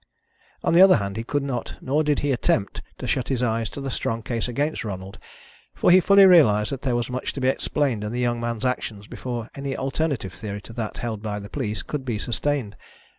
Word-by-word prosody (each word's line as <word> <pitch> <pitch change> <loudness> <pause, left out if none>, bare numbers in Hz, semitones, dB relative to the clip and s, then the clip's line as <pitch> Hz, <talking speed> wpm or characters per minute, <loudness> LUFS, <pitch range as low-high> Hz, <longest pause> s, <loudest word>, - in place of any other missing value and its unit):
On - - +2
the 170 - +7
other 190 0 +8
hand, 100 -3 -2
he 115 - -3
could 145 +4 -1
not, 130 -4 -4
nor 145 +4 +1
did 150 -2 +1
he 145 - +1
attempt, 120 -5 0 0.2
to - - -6
shut 125 - 0
his 125 -2 0
eyes 115 -2 0
to - - -8
the 135 -1 -4
strong 115 -1 -2
case 115 0 -2
against 145 +6 -1
Ronald, 95 -2 -6 0.6
for - - +3
he 185 - +8
fully 200 +2 +7
realised 110 - +5
that 135 -2 -4
there 130 -3 0
was 120 +1 -2
much 130 +1 -3
to - - -5
be 130 - +1
explained 135 -5 0
in 105 - -3
the 120 - -3
young 120 -1 0
man's 115 0 -3
actions 110 -5 -2
before 120 0 -5
any 140 -1 -4
alternative 135 - -2
theory 105 +2 -6
to 115 - -12
that 115 -2 -4
held 110 -3 -4
by 105 -1 -3
the 100 0 -8
police 110 -6 -3
could 150 -3 -4
be 120 -4 -2
sustained. 120 0 -2
120 Hz, 230 wpm, -24 LUFS, 110-140 Hz, 0.6 s, other